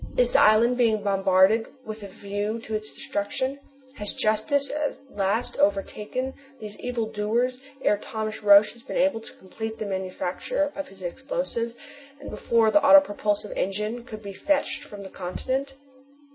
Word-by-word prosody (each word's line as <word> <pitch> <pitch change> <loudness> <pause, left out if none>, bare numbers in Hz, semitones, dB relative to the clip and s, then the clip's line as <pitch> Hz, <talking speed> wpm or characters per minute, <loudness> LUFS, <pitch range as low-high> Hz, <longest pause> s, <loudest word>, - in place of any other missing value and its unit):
Is - - +3
the - - +5
island 230 +3 +5
being 220 -4 +2
bombarded 195 +2 +3 0.2
with 215 0 -7
a 200 - -7
view 205 +3 -3
to 220 - -7
its 215 0 -3
destruction? 260 +7 -3 0.4
Has 210 -1 -2
justice 275 +6 +1
at 300 -1 -2 0.2
last 205 +4 0
overtaken 260 -1 0 0.3
these 210 -1 -8
evil 245 -2 -2
doers 230 +4 -1 0.2
ere 205 - +3
Thomas 220 0 -5
Roch 205 0 +7
has 235 - -15
been - - -5
able 270 -4 +2
to - - -12
complete 220 +4 -6
the 215 - -4
manufacture 190 - -2
of 290 -1 -5
his 195 -4 -14
explosive, 235 - -3 0.4
and 285 - -8
before 225 -2 +2
the 305 - +5
autopropulsive 215 -8 +4
engine 210 +5 -2
could 215 -3 -9
be 200 -1 -7
fetched 295 +5 0
from 205 -7 -9
the 190 - -8
continent?" 260 +9 -3
220 Hz, 160 wpm, -25 LUFS, 205-260 Hz, 0.4 s, Roch